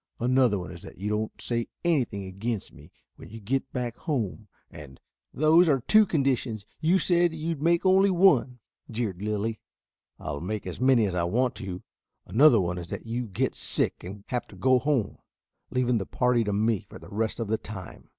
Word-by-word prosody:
Another 125 -3 +3
one 90 - -6
is - - -10
that - - -12
you 100 +3 -3
don't 105 +1 -3
say 115 -1 -1 0.2
anything 125 - 0
against 100 +3 -4
me - - -16 0.3
when - - -12
you 115 +2 -9
get 130 +6 -2
back 120 -2 -3
home, 115 - -3 0.2
and 70 -3 -12 0.2
" - - -62
"Those 160 +4 +4
are 135 -4 +2
two 215 - +5
conditions. 130 - -1
You 170 +4 +3
said 175 -2 +2
you 160 +1 -4
would 160 -4 -3
make 170 +3 +2
only 190 +1 +5
one," 170 -9 +4 0.3
jeered 110 -5 -3
Lilly. 105 +1 -2 0.6
"I'll 70 0 -5
make 105 +4 -4
as - - -6
many 130 -4 +4
as 95 - -2
I 85 -1 0
want 125 +8 +1
to. 95 -2 -6 0.4
Another 120 +4 +5
one 90 -1 -1
is 85 -1 -8
that - - -6
you 120 +1 -3
get 95 - -1
sick - - 0
and 100 +3 -8
have 125 -2 -2
to - - -14
go 130 -1 +3
home, 130 -7 -1 0.5
leaving 125 -2 +1
the 95 - -5
party 125 -2 +2
to 105 - -1
me 105 0 0
for - - -10
the - - -13
rest 110 +3 -2
of 115 - -2
the 110 +1 0
time." 100 -4 -10
115 Hz, 200 wpm, -27 LUFS, 105-135 Hz, 0.6 s, two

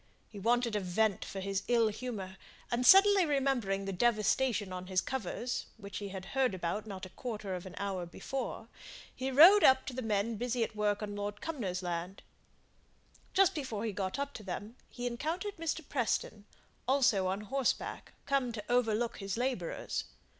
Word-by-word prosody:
He 205 - -10
wanted 235 +1 +2
a - - +2
vent 200 +2 +1
for 195 - -6
his 195 0 -1
ill 235 -2 +4
humour; 210 -5 -5 0.4
and 240 +1 +1
suddenly 390 0 +8
remembering 265 - 0
the 195 - -3
devastations 215 0 +2
on 185 0 -6
his 185 -1 +2
covers, 255 +1 -3
which 200 -2 -7
he 200 -1 -5
had 190 -1 -7
heard 260 -6 +2
about 185 +5 -3
not 195 -2 -6
a - - -10
quarter 215 -3 -5
of 180 0 -5
an 185 - -10
hour 190 -3 -3
before, 245 +4 -5 0.5
he 260 +1 -2
rode 330 +10 +9
towards 260 0 +5
the 255 - -3
men 220 0 0
busy 245 +1 0
at 225 - -4
work 210 0 0
on 205 -1 -4
Lord 205 0 -4
Cumnor's 195 - -3
land. 175 +2 -4 1.1
Just 390 -2 +5
before 235 -8 -3
he 220 - -1
got 195 +3 -3
up 280 0 -3
to - - -8
them 205 +4 -6
he 245 - -6
encountered 325 - -3
Mr. 320 -2 -3
Preston, 220 -5 -1 0.4
also 245 -8 +3
on 190 +2 -1
horseback, 265 +5 -2
come 275 -3 +1
to 210 -2 -5
overlook 235 -1 +1
his 195 0 -4
labourers. 245 -9 -2
220 Hz, 175 wpm, -32 LUFS, 195-260 Hz, 1.1 s, rode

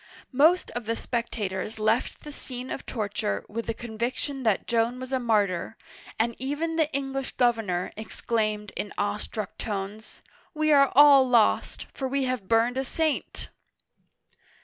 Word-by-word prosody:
Most 315 +7 +4
of 240 -2 -5
the 230 - 0
spectators 220 -4 -3
left 220 +3 0
the 300 - -8
scene 255 -2 -6
of - - -6
torture 200 - -2
with 230 +2 -5
the 230 - -2
conviction 240 +5 -4
that 220 -6 +1
Joan 235 +2 +1
was 255 +1 -6
a 260 - +2
martyr, 210 -4 0 0.4
and 230 +1 0
even 290 +5 -2
the 320 -2 +1
English 270 -1 -3
governor 225 -8 +1
exclaimed 215 -1 -2
in 205 - -4
awestruck 210 0 -3
tones: 205 0 -5
" - - -32
We 310 0 +2
are 275 -2 +6
all 280 -2 +8
lost, 235 -3 +2
for 265 - -3
we 275 +1 0
have 255 -6 -2
burned 230 +3 +3
a - - 0
saint 310 +2 -2
235 Hz, 150 wpm, -26 LUFS, 215-270 Hz, 0.4 s, all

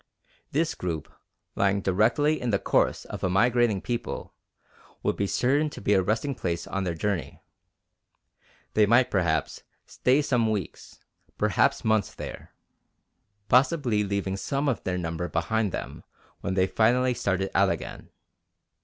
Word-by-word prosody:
This 160 +3 +1
group, 85 -4 -4 0.5
lying 100 0 +2
directly 115 +12 +2
in 125 - -1
the 100 - +3
course - - +1
of - - -7
a 95 - +2
migrating 115 +1 +2
people, 120 -1 -4 0.7
would - - +1
be 100 - -1
certain 140 +9 +1
to - - -9
be 100 - +1
a 95 - +4
resting 115 +9 -1
place 85 -8 -3
on 95 0 -3
their 85 -2 -2
journey. 95 0 -3 1.3
They 105 -1 +4
might, 120 +3 +4
perhaps, 85 -5 0 0.2
stay 135 +4 +2
some 120 -5 +1
weeks, 105 -5 -5 0.4
perhaps - - +2
months 110 -3 +1
there, - - -8 1.0
possibly 125 -3 +3
leaving 100 -1 -2
some 140 +7 -2
of 130 - -1
their 90 -1 -1
number 85 0 -3
behind 90 +6 0
them - - -6 0.4
when 95 -1 -3
they 95 -1 +3
finally 125 +5 +2
started 95 -4 -1
out - - +4
again. - - -5
105 Hz, 145 wpm, -26 LUFS, 95-125 Hz, 1.3 s, a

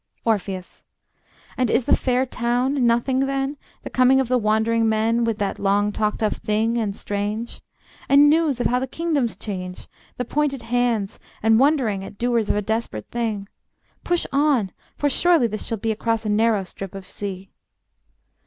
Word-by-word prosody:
Orpheus: 195 -4 -2 0.7
And 250 -2 +1
is 240 - +2
the - - +5
fair 255 0 +1
town 245 +1 0
nothing 240 +3 +2
then, 275 +1 -1 0.3
The - - -7
coming 255 +1 +4
of 260 -3 0
the 255 - +3
wandering 220 +1 +2
men 225 +2 +1
With 225 -2 -1
that 200 -2 -2
long 205 +1 +2
talked 210 +1 -1
of 215 - 0
thing 220 +2 0
and 205 -3 -2
strange. 205 +3 -4 0.5
And 280 +1 +7
news 305 -4 +3
of 245 - -1
how 250 - +2
the 265 - -3
kingdoms 295 -5 -1
change, 185 -3 -6 0.3
The 250 - -2
pointed 275 -2 -1
hands, 230 -4 0 0.2
and 225 0 +5
wondering 255 -9 +2
At 200 +1 -10
doers 235 -2 0
of - - +2
a 210 - 0
desperate 220 - -3
thing? 220 -4 -2 0.6
Push 350 -1 0
on, 275 -8 +2 0.3
for 290 - +1
surely 335 0 +3
this 215 -2 -3
shall 225 - -2
be 220 +2 -1
Across 225 +1 -1
a - - -1
narrow 215 -1 +2
strip 195 +1 -9
of 190 -1 -8
sea. 190 -1 -7
230 Hz, 170 wpm, -22 LUFS, 210-255 Hz, 0.7 s, And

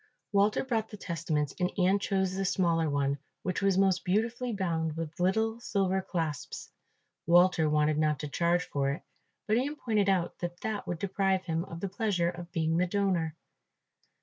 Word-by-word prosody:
Walter 205 +1 +3
brought 225 -4 -1
the 210 - -9
testaments 160 -6 -2
and 180 0 +1
Ian 190 +1 +3
chose 190 -2 0
the 195 +1 -1
smaller 170 -4 +2
one, 140 0 0 0.2
which 185 +2 -1
was 195 -1 +3
most 190 -2 +3
beautifully 230 +6 0
bound 165 -6 -1
with 165 0 -5
little 220 +5 +1
silver 190 -4 0
clasps. 160 -7 -4 0.6
Walter 175 -2 +5
wanted 150 0 +2
not 155 -1 +2
to 150 - -3
charge 170 +4 +1
for 140 -1 -1
it, 140 - -3 0.4
but 215 +1 +2
Ian 280 +5 -1
pointed 215 -8 +1
out 180 -3 0
that 175 0 -5
that 215 -2 -3
would 175 - -2
deprive 190 0 0
him 165 -1 -1
of 165 -2 -8
the 200 - -1
pleasure 190 -4 0
of 175 -1 -9
being 165 0 +1
the 180 +1 +2
donor. 180 -5 0
180 Hz, 175 wpm, -30 LUFS, 165-200 Hz, 0.6 s, Walter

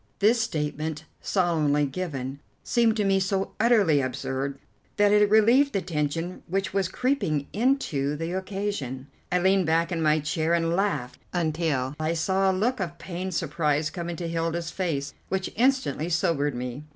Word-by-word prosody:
This 225 +3 +4
statement, 155 -4 -3 0.2
solemnly 155 -6 +2
given, 140 -3 -4 0.2
seemed 230 -2 +2
to 210 - +1
me 195 0 +3
so 190 +1 -1
utterly 210 - +4
absurd 135 +1 -3 0.4
that 205 0 +4
it 210 0 +5
relieved 235 +7 +5
the 195 - +1
tension 165 +2 -2
which 190 +1 -1
was 195 -2 +1
creeping 185 - 0
into 200 - +1
the 165 +3 -4
occasion. 190 -9 -3 0.3
I 180 - +3
leaned 190 0 +3
back 165 +2 +2
in 170 -2 -1
my 155 0 +3
chair 160 +2 0
and 165 0 +1
laughed 150 -11 -1
until 155 -6 0
I 155 +2 0
saw 190 +4 +2
a - - +4
look 220 +7 0
of 170 -3 -4
pained 185 0 -5
surprise 150 -2 0
come 170 -1 -5
into 175 0 -4
Hilda's 165 0 -2
face, 145 -7 -2 0.2
which 190 0 -2
instantly 235 - +1
sobered 150 -4 +1
me. 125 +2 -4
170 Hz, 160 wpm, -26 LUFS, 150-195 Hz, 0.4 s, it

